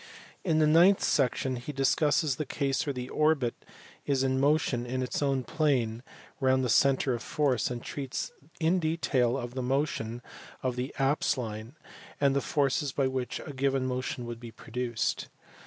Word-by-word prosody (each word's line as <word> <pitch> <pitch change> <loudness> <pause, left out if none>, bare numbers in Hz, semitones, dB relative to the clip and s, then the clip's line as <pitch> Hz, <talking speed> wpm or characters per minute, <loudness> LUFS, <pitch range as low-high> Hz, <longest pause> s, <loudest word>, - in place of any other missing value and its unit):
In 165 -4 +2
the 155 - +5
ninth 170 +6 +5
section 130 -1 +1
he 125 +5 -6
discusses 145 +1 +2
the - - -1
case 140 -2 0
where 140 - 0
the 125 0 -5
orbit 150 -6 +2 0.5
is 135 -2 +1
in 130 0 +1
motion 140 -4 +2
in 130 +1 -2
its 125 - -2
own 135 -2 +1
plane 125 -5 0 0.4
round 130 -1 +3
the 125 - 0
centre 135 +1 +3
of 120 - -3
force, 135 -2 0
and 120 -1 -5
treats 135 -2 -4 0.3
in 170 +3 +3
detail 140 -7 +1
of 120 -2 -5
the 130 - -3
motion 125 -3 -1 0.4
of 130 -1 0
the 125 +2 -3
apse 135 +1 +1
line, 110 +1 -5 0.4
and 140 -1 +3
the 140 - +2
forces 145 0 +1
by 135 0 0
which 130 -1 -2
a 145 - -7
given 135 -1 0
motion 125 -1 -3
would 120 -1 -6
be 120 -1 -8
produced. 120 +1 -3
130 Hz, 170 wpm, -29 LUFS, 125-145 Hz, 0.5 s, the